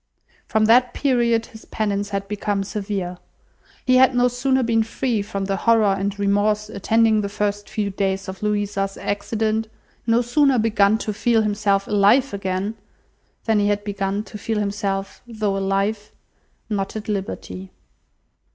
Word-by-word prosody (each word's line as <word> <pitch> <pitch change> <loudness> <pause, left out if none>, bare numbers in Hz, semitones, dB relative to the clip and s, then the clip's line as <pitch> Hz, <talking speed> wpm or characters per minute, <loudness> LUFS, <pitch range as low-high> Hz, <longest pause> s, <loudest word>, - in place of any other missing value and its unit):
From 220 0 +2
that 245 +3 +4
period 235 -4 +2
his 220 - -14
penance 205 -2 -2
had 200 -1 -3
become 205 -1 -2
severe. 195 -3 -4 0.7
He 255 0 +5
had 260 0 +5
no 245 0 +4
sooner 260 +2 +1
been 230 -1 +2
free 225 0 -1
from 200 -1 -4
the 195 0 -1
horror 225 -3 +3
and 195 +1 -2
remorse 205 +1 +1
attending 220 +2 +2
the 200 - -3
first 205 0 -2
few 205 -2 -2
days 195 0 -1
of 190 0 -7
Louisa's 205 -2 -1
accident, 220 +2 -1 0.4
no 230 +1 +3
sooner 270 +2 +3
begun 215 -2 +3
to 215 -1 -3
feel 225 +1 +2
himself 205 -2 +1
alive 210 +6 +3
again, 195 +1 -2 0.7
than 220 -2 +3
he 205 - +2
had 205 0 0
begun 200 0 -2
to 210 0 -10
feel 220 +1 -2
himself, 200 -1 -2
though 215 -4 -2
alive, 195 +2 -1 0.6
not 200 -2 -3
at 215 -1 -6
liberty. 195 -2 -4
210 Hz, 150 wpm, -22 LUFS, 200-225 Hz, 0.7 s, He